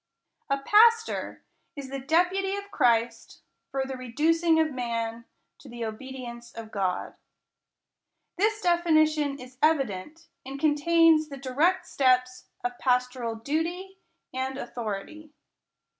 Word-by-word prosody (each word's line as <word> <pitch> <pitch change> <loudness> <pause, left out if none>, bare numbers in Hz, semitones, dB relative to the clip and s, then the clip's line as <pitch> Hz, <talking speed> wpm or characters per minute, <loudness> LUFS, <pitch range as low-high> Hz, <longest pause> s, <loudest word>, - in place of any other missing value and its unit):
A 275 - +2
Pastor 455 +10 +3 0.3
is 275 -2 -8
the 275 - -3
deputy 360 +7 +1
of 405 0 -7
Christ, 235 - 0 0.3
for 270 -1 -2
the 265 0 -5
reducing 320 +7 +2
of 315 -1 +2
man 230 -2 -3 0.3
to 275 - -14
the 240 0 -9
ohedience 235 +1 -8
of 225 -1 -8
God. 185 -3 -2 1.2
This 430 +3 +1
definition 310 -5 +2
is 255 0 -12
evi 300 0 +3
dent, 250 - -9 0.2
and 270 +1 -7
contains 310 +1 +4
the 275 - -7
dii 275 +5 +2
ect 375 - -10
steps 255 -1 +1 0.2
of 245 0 -3
pastoral 250 -2 0
duty 340 +10 -3 0.3
and 260 +1 -3
authority. 245 +8 -6
275 Hz, 125 wpm, -27 LUFS, 245-325 Hz, 1.2 s, contains